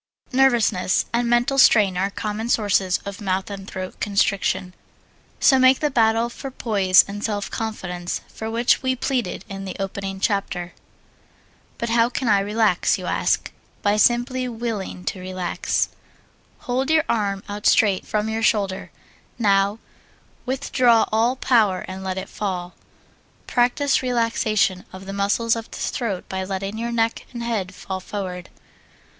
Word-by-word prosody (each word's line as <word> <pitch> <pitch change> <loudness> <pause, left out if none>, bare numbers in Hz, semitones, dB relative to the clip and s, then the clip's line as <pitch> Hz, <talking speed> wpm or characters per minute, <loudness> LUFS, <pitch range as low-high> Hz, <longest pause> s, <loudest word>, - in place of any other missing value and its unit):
Nervousness 240 -8 +3
and 235 0 +1
mental 240 +3 +2
strain 205 -7 +6
are 190 +2 0
common 215 +3 -4
sources 200 -5 +2
of 200 +1 -7
mouth 190 0 -1
and 195 -1 -7
throat 185 0 -6
constriction, 200 -2 0 0.7
so 265 -2 +5
make 260 0 +5
the 300 -1 0
battle 225 -1 +3
for 270 +3 -7
poise 200 -7 +4
and 205 +1 -6
self 205 -2 -2
confidence 180 -6 -4
for 220 - -6
which 235 +2 +2
we 260 -1 0
pleaded 245 -8 -2
in 195 0 -7
the 190 -1 -6
opening 195 0 -4
chapter. 190 -3 -1 1.0
But 235 - -3
how 230 +1 +3
can 255 0 -3
I 205 -2 +5
relax? 205 -2 +2
you - - -7
ask. - - 0 0.3
By 205 0 +3
simply 245 +3 +2
willing 225 -6 -4
to 190 - -3
relax. 185 -1 -1 0.7
Hold 260 +3 -1
your 315 -1 +4
arm 200 -3 -1
out 205 0 -2
straight 200 -4 +4
from 210 0 -1
your 220 0 -2
shoulder. 200 -4 0 0.5
Now 200 -1 +2 0.7
withdraw 255 -3 +3
all 230 +4 +2
power 220 -8 +2
and 190 +1 -7
let 190 0 -3
it 190 - -4
fall. 180 -3 -4 0.7
Practise 255 +3 +2
relaxation 230 -6 +1
of 190 +1 -10
the 195 - -6
muscles 205 +4 +1
of 230 0 -6
the - - -9
throat 205 -7 -3
by 190 0 -3
letting 195 +3 -4
your 235 +1 -2
neck 230 -1 -1
and 235 -1 -5
head 200 -6 -2
fall 190 0 -5
forward. 185 -2 -6
210 Hz, 150 wpm, -22 LUFS, 190-235 Hz, 1.0 s, strain